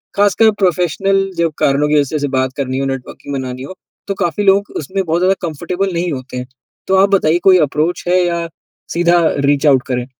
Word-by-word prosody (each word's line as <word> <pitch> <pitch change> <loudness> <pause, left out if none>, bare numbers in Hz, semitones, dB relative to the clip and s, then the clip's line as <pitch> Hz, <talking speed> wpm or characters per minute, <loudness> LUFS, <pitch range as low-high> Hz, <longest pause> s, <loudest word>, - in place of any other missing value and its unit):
ख़ासकर 205 +2 +4
प्रोफ़ेशनल 195 +2 +1
जो 170 -1 +2
कारणों 140 +2 +2
की 150 0 +3
वज़ह 145 +2 -1
से 145 - -1
बात 130 0 0
करनी 130 -1 -2
हो 135 - -1
नेटवर्किंग 135 +1 -6
बनानी 130 -1 -5
हो, 185 +7 -9 0.3
तो 200 - -1
काफ़ी 175 +4 -1
लोग 200 +1 +3
उसमें 190 +6 -3
बहुत 165 0 0
ज़्यादा 190 +1 +3
कंफ़र्टेबल 180 +5 -3
नहीं 170 0 -1
होते 130 -1 -7
हैं 125 0 -5 0.4
तो 190 - +2
आप 195 - +3
बताइए 170 -2 +2
कोई 185 - +7
अप्रोच 155 +5 -2
है 180 0 +3
या 170 -1 -2 0.5
सीधा 175 0 +3 0.3
रीच 145 +1 +2
आउट 130 -3 +4
करें? 125 -1 -2
170 Hz, 200 wpm, -16 LUFS, 140-185 Hz, 0.5 s, कोई